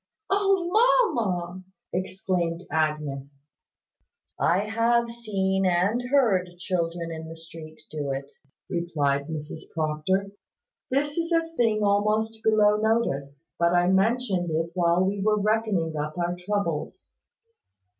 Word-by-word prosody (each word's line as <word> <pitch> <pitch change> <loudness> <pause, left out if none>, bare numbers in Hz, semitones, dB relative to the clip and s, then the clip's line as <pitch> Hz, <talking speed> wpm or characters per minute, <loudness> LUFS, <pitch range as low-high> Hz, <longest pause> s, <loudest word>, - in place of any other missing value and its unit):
"O 390 -3 +2
mamma!" 230 - +2 0.3
exclaimed 180 -2 -2
Agnes. 145 -3 -2 1.0
"I 180 +4 +3
have 230 +2 +1
seen 195 -5 -1
and 185 +7 +2
heard 220 -10 +3
children 170 -2 -2
in 160 0 -6
the 165 - -8
street 160 -1 -11
do 150 -2 -3
it," 135 +1 -5 0.4
replied 150 -6 -1
Mrs 155 0 -7
Proctor. 160 +5 0 0.6
"This 290 +3 0
is 335 +1 -2
a 330 0 0
thing 220 -4 +2
almost 215 +2 +1
below 210 -1 +4
notice; 165 -10 -1
but 170 0 +3
I 175 0 +3
mentioned 195 -2 +1
it 165 +1 -1
while 175 0 +3
we 195 +1 -1
were 210 +1 +2
reckoning 205 -6 0
up 150 +1 -4
our 175 0 -1
troubles." 180 - -3
185 Hz, 120 wpm, -26 LUFS, 165-220 Hz, 1.0 s, below